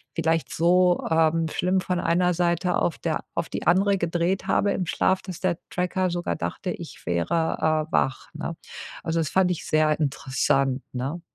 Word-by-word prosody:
vielleicht 165 -1 0
so, 180 +2 +3
ähm, 165 0 +3
schlimm 185 +3 +1
von 180 -1 -1
einer 180 +2 +2
Seite 175 +1 +1
auf 170 - 0
der 160 -2 -2
auf 170 -1 -2
die - - -5
andere 195 +3 +4
gedreht 170 +2 -1
habe 200 - +2
im 185 - -1
Schlaf, 185 +3 +1
dass 185 -3 -8
der 180 -2 +1
Tracker 180 +1 0
sogar 175 - -2
dachte, 85 0 -4
ich - - -8
wäre, 155 - 0
äh, - - -25
wach, 135 - 0
ne? 165 +2 -4 0.5
Also, 165 0 0
das 160 -3 0
fand 185 -1 +3
ich 175 - -4
sehr 155 0 +2
interessant, 135 -2 0
ne? 135 +7 -3
170 Hz, 175 wpm, -25 LUFS, 155-180 Hz, 0.5 s, andere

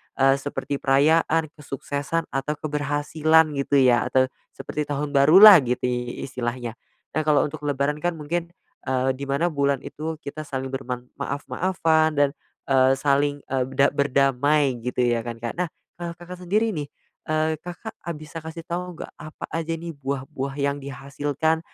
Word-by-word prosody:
eee, 135 0 +4
seperti 140 0 -4
perayaan, 155 +3 +3
kesuksesan, 145 +3 -3
atau 135 +2 -1
keberhasilan 150 +2 +2
gitu 140 +1 0
ya, 120 -2 +4
atau 130 0 +2 0.3
seperti 145 +2 -4
tahun 145 0 -2
barulah 175 +8 +9
gitu 125 +1 -1
i 125 -1 -2
istilahnya. 120 -2 -4 0.4
Nah, 155 - +2
kalau 150 -1 +5
untuk 150 0 -8
lebaran 145 +1 0
kan 175 +1 -1
mungkin, 165 +3 -3 0.4
eee, 130 0 +1
di 140 - -5
mana 140 +6 +1
bulan 140 -2 +1
itu 160 +2 -5
kita 155 +1 -6
saling 130 -1 -4
berman 125 -2 -4 0.2
maaf-maafan, 160 +3 +1
dan, 145 -1 +4 0.4
eee, 130 -1 +5
saling, 145 +1 +2 0.2
eee, 130 -1 +2
da 140 +1 +5
berdamai 140 -1 +2
gitu 125 +1 -1
ya 120 -1 +2
kan, 120 -1 -4
Kak, 115 -1 -2
nah 180 - +1 0.3
kalau 170 -1 -5
Kakak 175 +1 -10
sendiri 215 +4 +2
nih, 150 -6 -4 0.4
eee, 155 0 0
Kakak 180 +7 -8
a - - -8
bisa 155 +1 -8
kasih 160 +1 -8
tahu 180 0 -4
nggak, - - -10
apa 155 +1 -8
aja 165 0 -2
nih 170 +1 -6
buah-buah 135 0 -4
yang 140 0 0
dihasilkan 140 +3 -2
145 Hz, 160 wpm, -24 LUFS, 135-160 Hz, 0.4 s, barulah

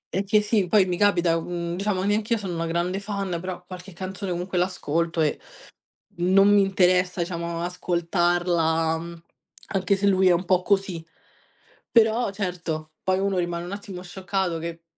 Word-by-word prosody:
È 195 - +1
che 210 +2 +3
sì, 210 -3 +1
poi 195 +1 +4
mi 180 -1 -1
capita, 175 -4 +3
mhmm, 170 0 -4
diciamo 195 0 -1
neanch'io 215 +3 +1
sono 190 -4 -5
una 165 0 -2
grande 175 +3 -1
fan, 200 -2 -4
però 185 0 -6
qualche 180 0 -10
canzone 190 +2 -5
comunque 180 +1 -2
l'ascolto 170 -2 -1
e, 150 -2 +1 0.8
non 190 +3 +5
mi 205 - +6
interessa, 185 -1 +2
diciamo 170 -1 -3
ascoltarla 170 -2 0 0.5
anche 195 +1 +2
se 200 +1 +1
lui 190 -1 +4
è - - +6
un 175 +2 +1
po' 185 0 +3
così. 190 -4 0 0.8
Però 230 0 +3
certo, 175 -5 -4
poi 185 0 +1
uno 195 -1 0
rimane 175 0 -2
un 180 - -7
attimo 200 -3 -7
scioccato 185 -1 -2
che, 165 0 -6
180 Hz, 160 wpm, -24 LUFS, 170-195 Hz, 0.8 s, mi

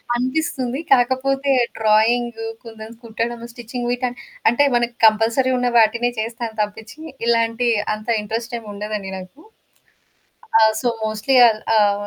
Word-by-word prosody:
అనిపిస్తుంది. 260 0 -2
కాకపోతే 270 +2 +1 0.3
డ్రాయింగు, 225 +1 +2 0.2
కుందన్స్ 225 0 -11
కుట్టడము, 230 +1 -4
స్టిచ్చింగ్ 240 +1 -6
వీట 245 +1 -3 0.5
అంటే 240 +5 +3
మనకు 240 0 0
కంపల్సరీ 225 +4 +3
ఉన్న 245 0 0
వాటినే 235 +2 +3
చేస్తాను 230 0 -4
తప్పించి 220 +6 -6 0.3
ఇలాంటి 230 +1 +1 0.3
అంత 215 0 -12
ఇంట్రెస్టేం 230 +2 -5
ఉండదండి 205 -1 -5
నాకు. 185 +11 -12 1.2
ఆ! - - +4 0.2
సో, 250 - 0 0.2
మోస్ట్‌లీ 215 +4 -1
అది 215 -1 -1 0.2
ఆహ్, 205 -1 +2
230 Hz, 120 wpm, -20 LUFS, 220-245 Hz, 1.2 s, ఆ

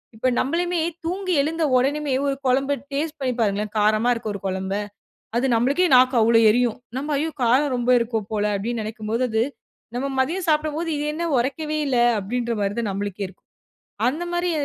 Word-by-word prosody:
இப்ப 225 +4 -1
நம்மலுமே 345 +4 0 0.3
தூங்கி 370 +2 -1
எழுந்த 320 +3 -1
உடனுமே 285 +2 0
ஒரு 275 - 0
குழம்ப 270 +2 +2 0.2
டேஸ்ட் 310 +2 -2
பண்ணி 260 -2 -1
பாருங்களேன். 210 -1 0
காரமா 215 +3 +3
இருக்க 230 - -6
ஒரு 200 - -7
குழம்ப, 190 +1 -3 0.6
அது 250 - +2
நம்மளுக்கே 275 +10 +2
நாக்கு 255 0 +5
அவ்ளோ 225 +1 +5
எரியும். 240 0 +2 0.2
நம்ம 295 +2 -2
"ஐயோ! 320 +2 -1
காரம் 260 +4 +3
ரொம்ப 245 0 0
இருக்கு 230 -1 -1
போல" 210 -1 0
அப்டினு 230 +3 -3
நினைக்கும்போது 220 +2 -2
அது 220 +1 +2 0.5
நம்ம 270 +3 -1
மதியம் 345 +7 -1
சாப்டும்போது 310 +2 0
இது 290 - -2
என்ன 340 +2 -2
உரைக்கவே 300 +5 -1
இல்ல 255 -3 +1 0.2
அப்டின்ற 235 +4 -2
மாரி 200 0 0
தான் 215 - -2
நம்பளுக்கே 200 0 -3
இருக்கும். 185 - -21 0.6
அந்த 300 +7 -2
மாரி 350 0 0
250 Hz, 170 wpm, -23 LUFS, 220-300 Hz, 0.6 s, நாக்கு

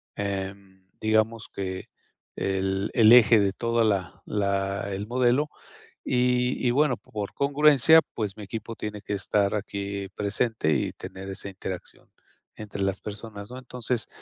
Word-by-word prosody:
em 95 -1 -5 0.2
digamos 110 +1 +1
que 95 -1 -4 0.5
el 95 +1 -1
el 110 -2 +6
eje 120 -2 +8
de 100 -1 +2
toda 115 +1 +1
la 100 -4 -1
la 100 -1 -1
el 100 +2 -3
modelo, 125 +5 +2 0.6
y 125 0 +1
y 120 - +4
bueno, 140 -2 +2
por 105 -2 -6
congruencia, 145 +2 +5
pues 105 -3 -3
mi 105 - -7
equipo 115 +2 -6
tiene 105 -1 -5
que - - -3
estar 100 0 +1
aquí 100 -1 -4
presente 105 -4 0
y 70 - 0
tener 95 +1 -8
esa 95 +1 -5
interacción 95 -1 -8 0.5
entre 105 -2 -7
las 100 0 0
personas 105 0 -7
¿no? 130 - -7
Entonces, 125 -1 -3
105 Hz, 145 wpm, -26 LUFS, 100-120 Hz, 0.6 s, eje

